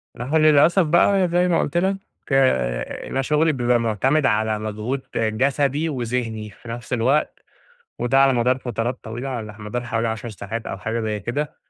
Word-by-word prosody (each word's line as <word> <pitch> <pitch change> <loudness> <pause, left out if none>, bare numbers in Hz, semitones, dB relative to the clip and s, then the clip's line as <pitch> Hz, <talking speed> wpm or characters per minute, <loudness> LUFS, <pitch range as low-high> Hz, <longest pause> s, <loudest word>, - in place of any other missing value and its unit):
ما 120 - -5
هو 155 +5 +1
للأسف 155 +4 +5
بقى 180 +4 +3
زي 175 +1 +2
ما 170 - +2
قلت 145 - -1
لك، 190 +2 +1 0.3
آآ، 65 - +1
أنا 135 - 0
شغلي 150 +4 +2
بيبقى 120 -2 +2
مُعتمد 130 +7 +1
على 110 -2 +1
مجهود 110 +5 -3
جسدي 135 +7 +1
وذهني 115 -5 -3
في 115 +4 -14
نفس 120 +2 -6
الوقت، 130 +6 +1 0.6
وده 130 +3 +2
على 135 -1 +5
مدار 125 +1 +2
فترات 120 -1 -3
طويلة، 120 +4 -5
على 110 -5 -5
مدار 105 +4 -4
حوالي 115 -1 -1
10 115 +1 -4
ساعات 110 +2 -6
أو - - -5
حاجة 110 +5 -3
زي 110 -1 -2
كده، 130 +9 -3
120 Hz, 175 wpm, -22 LUFS, 110-140 Hz, 0.6 s, للأسف